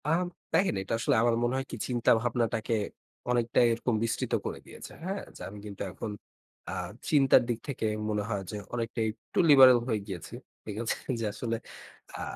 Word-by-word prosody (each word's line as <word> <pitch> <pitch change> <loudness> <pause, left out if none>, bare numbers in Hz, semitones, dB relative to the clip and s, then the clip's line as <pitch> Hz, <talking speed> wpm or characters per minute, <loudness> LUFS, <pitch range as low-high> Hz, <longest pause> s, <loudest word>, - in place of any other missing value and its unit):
আম 170 +3 +2 0.3
দেখেন 180 - +3
এটা 95 - -4
আসলে 140 +4 +2
আমার 120 -1 +3
মনে 120 +1 +1
হয় 135 - -2
কি - - -3
চিন্তাভাবনাটাকে 115 -1 +1 0.6
অনেকটাই 120 0 +3
এরকম 120 +1 -1
বিস্তৃত 115 0 -1
করে - - -4
দিয়েছে। - - -10
হ্যাঁ? 195 +3 -3
যে - - -12
আমি 105 +1 -10
কিন্তু 100 -2 -8
এখন 105 +4 -5 0.6
আ - - -3 0.4
চিন্তার 135 -4 +6
দিক 120 -1 0
থেকে 135 -5 -3 0.2
মনে 105 -1 0
হয় 100 -3 -1
যে 105 - -4 0.2
অনেকটাই 115 -1 -1
একটু - - -5
লিবারেল 130 -4 +9
হয়ে 110 -4 +1
গিয়েছি। 90 -5 -7 0.3
ঠিক 105 - -5
আছে? 115 - 0 0.2
যে 115 - -1
আসলে 115 +2 -2 0.6
আ - - -5
115 Hz, 175 wpm, -29 LUFS, 110-130 Hz, 0.6 s, লিবারেল